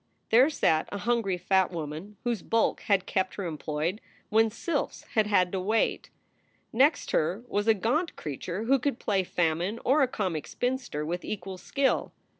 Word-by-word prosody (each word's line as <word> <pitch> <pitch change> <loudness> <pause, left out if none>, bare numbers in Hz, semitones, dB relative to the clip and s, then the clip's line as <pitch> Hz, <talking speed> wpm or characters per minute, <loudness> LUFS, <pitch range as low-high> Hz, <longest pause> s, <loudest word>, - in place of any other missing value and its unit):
There 250 +6 +6
sat 160 - +1
a 200 - -3
hungry 215 -4 0
fat 190 +1 +2
woman 165 +4 -6
whose 240 -5 -1
bulk 225 +4 +1
had 195 -3 +3
kept 190 -1 -1
her 200 - -4
employed 160 +4 -3 0.3
when 225 +1 +4
sylphs 285 +7 -3
had 215 -2 +3
had 185 -4 +3
to 190 - -1
wait. 215 +5 0 0.6
Next 280 +6 +3
her 175 +9 0
was 205 -1 -1
a 225 - +6
gaunt 270 - 0
creature 170 +7 -5
who 265 +4 +3
could 270 -1 -1
play 195 -3 0
Famine 175 +5 0
or 280 +4 +4
a 270 - +4
comic 185 -10 -3
spinster 245 - -2
with 175 +3 -3
equal 190 -2 -5
skill. 275 +6 0
200 Hz, 170 wpm, -28 LUFS, 180-235 Hz, 0.6 s, There